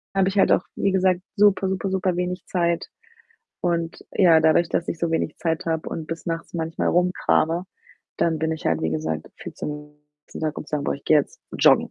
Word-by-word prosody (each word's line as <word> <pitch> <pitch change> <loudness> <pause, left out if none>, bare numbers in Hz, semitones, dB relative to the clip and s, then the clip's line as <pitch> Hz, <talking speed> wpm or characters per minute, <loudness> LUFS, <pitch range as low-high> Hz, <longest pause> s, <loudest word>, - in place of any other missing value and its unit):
habe 190 0 +3
ich 200 - -5
halt - - +4
auch, 180 - +2
wie 195 - +1
gesagt, 185 -1 +2 0.2
super, 200 -2 +4
super, 190 0 -2
super 185 -1 0
wenig 180 +1 -3
Zeit. 170 -2 0 0.7
Und 170 -2 -1
ja, 165 -4 +5
dadurch, 160 +2 +4
dass 170 - -1
ich 165 - -3
so 170 0 -1
wenig 160 -2 -1
Zeit 160 -2 -1
habe 160 -1 -1
und 160 -1 -5
bis 165 +1 -6
nachts 165 -1 -4
manchmal 165 -1 -1
rumkrame, 175 -1 +2 0.5
dann 165 -2 +1
bin 160 +1 0
ich 160 - -5
halt, 80 -1 +1
wie 80 - 0
gesagt, 80 0 -3
viel - - -9
zu - - -5
müde, 150 0 -5
am 150 - -26 0.3
nächsten - - -9
Tag 155 -1 -2
um - - -7
zu - - -15
sagen: 145 -2 -1
„Boah, - - 0
ich 140 - -12
gehe 155 - +5
jetzt 140 - -4 0.2
joggen,“ - - +5
165 Hz, 225 wpm, -23 LUFS, 155-180 Hz, 0.7 s, ja